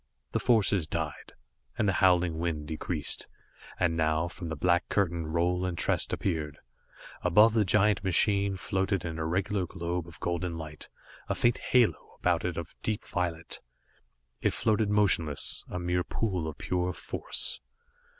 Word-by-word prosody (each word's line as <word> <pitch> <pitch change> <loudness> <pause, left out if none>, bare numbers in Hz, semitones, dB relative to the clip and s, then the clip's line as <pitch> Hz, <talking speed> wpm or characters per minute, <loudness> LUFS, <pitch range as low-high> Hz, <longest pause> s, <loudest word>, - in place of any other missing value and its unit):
The - - 0
forces 100 -7 +3
died, 80 -2 -4 0.4
and 110 - +2
the 95 - +3
howling 90 -3 +3
wind 80 -3 -2
decreased, 80 -1 -2 0.5
and 85 -2 +2
now, 80 +1 +1
from 85 -1 -7
the 80 - -3
black 85 +2 +2
curtain, 85 -5 0
Roal 85 +3 +1
and 90 -2 -2
Trest - - 0
appeared. 75 -6 -2 0.6
Above 105 +6 +5
the 110 -2 +4
giant 105 0 +3
machine 100 +1 +3
floated 95 0 -1
an 80 -1 -4
irregular 90 +4 0
globe 85 -1 -3
of 85 -3 -13
golden 85 -1 -2
light, 75 -2 -7 0.4
a - - +1
faint 120 0 +2
halo 115 - +2
about 90 -2 +2
it 90 -2 -2
of 85 -1 -5
deep 110 -2 -2
violet. 85 -2 -2 0.8
It - - +2
floated 110 -2 +2
motionless, 95 -8 +1
a - - -4
mere 90 0 0
pool 95 -5 -2
of 80 - -6
pure 90 0 -1
force. - - -2
90 Hz, 150 wpm, -29 LUFS, 80-95 Hz, 0.8 s, Above